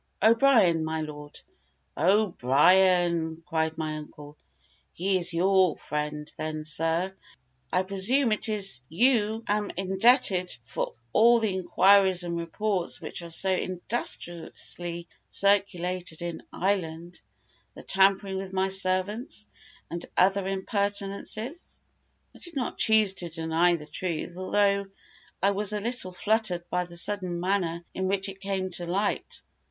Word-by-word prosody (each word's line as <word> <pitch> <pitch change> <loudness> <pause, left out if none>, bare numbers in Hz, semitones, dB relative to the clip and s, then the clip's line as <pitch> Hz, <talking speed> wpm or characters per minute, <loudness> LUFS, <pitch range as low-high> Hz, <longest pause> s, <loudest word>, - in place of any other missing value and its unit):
"O'Brien, 225 -8 +4
my 160 0 -2
lord." 150 -1 -8 0.6
"O'Brien!" 175 - +3
cried 160 -1 -1
my 155 -1 -3
uncle, 150 -1 -11 0.6
"he 190 +2 0
is 175 0 -1
your 185 0 +3
friend; 150 0 -4
then, 155 0 -4
sir, 165 +4 -1 0.6
I 185 - +2
presume 210 +7 +2
it 220 +1 +2
is 195 - +3
you 225 - +2
am 210 0 0
indebted 190 -1 +2
for 115 - -4 0.2
all 235 +2 +6
the 220 -4 0
inquiries 190 0 +4
and 170 -1 -3
reports 175 +2 -2
which - - -4
are 170 - -9
so 190 +3 +1
industriously 175 -2 -1 0.2
circulated 185 -4 0
in 170 -1 -5
Ireland 175 -3 -2 0.5
the - - -11
tampering 195 0 +2
with 190 0 -6
my 190 0 0
servants 195 +4 -1 0.5
and 170 +1 -5
other 195 +1 +3
impertinences?" 200 - -2 0.6
I - - -15
did 345 -2 -5
not 255 -3 -3
choose 220 -3 +4
to 175 -3 -4
deny 165 +2 +1
the 150 -3 -8
truth, 170 +2 -4
although 200 +1 +1 0.6
I 200 - +4
was 205 +1 0
a 210 - -1
little 230 -3 -2
fluttered 180 -2 -1
by 180 0 0
the 175 0 -9
sudden 180 -2 -1
manner 175 -2 -1
in 190 0 -2
which 195 +1 -1
it 195 0 -11
came 190 -1 -3
to 175 -1 -3
light. 200 +4 -2
185 Hz, 130 wpm, -27 LUFS, 170-200 Hz, 0.6 s, all